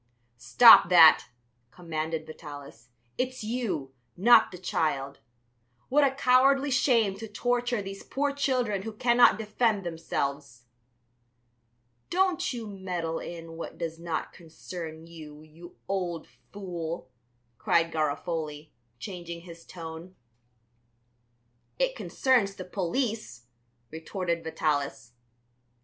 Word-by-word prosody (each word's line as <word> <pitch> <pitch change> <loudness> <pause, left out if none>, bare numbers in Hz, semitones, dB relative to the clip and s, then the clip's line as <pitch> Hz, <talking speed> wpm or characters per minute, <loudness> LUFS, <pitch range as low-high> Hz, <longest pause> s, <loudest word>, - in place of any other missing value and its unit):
"Stop 170 - +8
that," 165 -3 +7 0.4
commanded 160 0 -4
Vitalis; 145 -7 -11 0.3
"it's 255 -1 -2
you, 215 - -3 0.2
not 235 +7 +6
the 180 - -8
child! 140 -6 -2 0.7
What 290 +3 +4
a 280 - +5
cowardly 275 +1 +3
shame 230 -6 +2
to 225 +2 -7
torture 245 +1 -1
these 195 0 -8
poor 285 +1 -2
children 250 -8 0
who 220 +2 -6
cannot 240 +2 +4
defend 215 -1 0
themselves." 140 -6 -4 1.5
"Don't 370 -2 +1
you 235 -3 -5
meddle 180 -5 -4
in 165 -1 -8
what 165 - -7
does 165 -1 -5
not 165 -2 -4
concern 165 -1 -9
you, 155 -2 -12
you 165 +3 -15
old 180 -4 -3 0.3
fool," 170 -7 -6 0.5
cried 165 0 +2
Garofoli, 155 -1 -3 0.3
changing 170 - -7
his 170 -1 -12
tone. 165 +1 -9 1.6
"It - - 0
concerns 240 - +1
the 185 - -8
police," 190 - -3 0.5
retorted 170 +1 -3
Vitalis. 145 -7 -2
175 Hz, 105 wpm, -27 LUFS, 160-225 Hz, 1.6 s, Stop